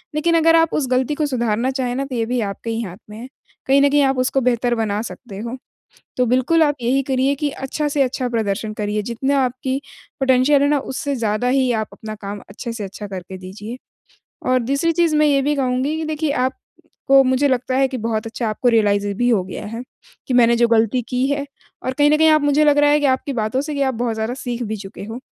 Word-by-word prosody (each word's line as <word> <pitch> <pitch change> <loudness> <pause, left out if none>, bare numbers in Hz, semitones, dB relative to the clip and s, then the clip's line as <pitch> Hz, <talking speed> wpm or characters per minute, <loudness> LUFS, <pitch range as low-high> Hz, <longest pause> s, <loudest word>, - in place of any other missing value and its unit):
लेकिन 335 +2 +2
अगर 330 0 +5
आप 330 -1 +3
उस 280 -4 0
गलती 255 +3 +1
को 305 - 0
सुधारना 240 -1 0
चाहें 250 -2 -2
ना, 275 - -2
तो 265 -2 -6
ये 230 -1 0
भी 245 +1 -1
आपके 230 +3 -7
ही 225 0 -2
हाथ 190 -4 -7
में 210 - -9
है। 245 - -8 0.4
कहीं 275 +1 +5
न 285 - +5
कहीं 290 +1 +3
आप 270 -1 +1
उसको 265 +1 +1
बेहतर 245 -1 +1
बना 215 -2 -1
सकते 205 -6 -10
हो। 235 +4 -5 0.6
तो 250 - +3
बिल्कुल 260 +7 +3
आप 290 -2 +1
यही 260 +4 +1
करिए 265 +2 +2
कि 290 +1 -1
अच्छा 285 +3 -3
से 290 -1 0
अच्छा 255 -1 -2
प्रदर्शन 215 -2 -2
करिए, 210 0 -2
जितना 265 +6 -1
आपकी 260 +2 -3 0.4
पोटेंशियल 265 +2 +4
है - - +3
ना, 295 - +2
उससे 275 +2 -3
ज़्यादा 225 0 -1
ही 260 -1 +2
आप - - -12
अपना 215 0 -8
काम 200 0 -6
अच्छे 230 +3 -6
से 215 -3 -5
अच्छा 200 +2 -7
करके 190 -1 -7
दीजिए। 205 +6 -8 0.7
और 255 0 +4
दूसरी 280 +7 0
चीज़ 335 -2 +2
मैं 305 0 +4
ये 280 -2 +3
भी 295 +2 0
कहूँगी 265 +2 0
कि 320 - -3
देखिए 310 -1 -1
आपको 270 0 0
मुझे 260 +2 +2
लगता 255 0 0
है 270 0 +3
कि 260 -1 -5
बहुत 220 -1 -2
अच्छा 225 0 -3
आपको 215 +4 -1
रियलाइज़ 205 -3 +2
भी 245 +1 +2
हो 215 -6 +2
गया 185 - -7
है, 230 +3 -6 0.4
कि 255 - -1
मैंने 235 -1 +5
जो 235 - +4
गलती 230 +1 +2
की 250 +1 0
है 280 0 -1 0.4
और 260 - -2
कहीं 290 +2 +3
न 305 - +4
कहीं 320 +1 +5
आप 310 -1 +4
मुझे 290 +1 +3
लग 295 -1 +4
रहा 290 0 +5
है 295 - +4
कि 290 - 0
आपकी 265 +1 0
बातों 225 +3 -1
से 295 0 -5
कि 280 - -2
आप 265 -1 +1
बहुत 235 0 -1
ज़्यादा 220 +2 -2
सीख 245 -2 -4
भी 220 -1 -3
चुके 195 -1 -9
हो, 225 +3 -7
255 Hz, 240 wpm, -20 LUFS, 225-280 Hz, 0.7 s, अगर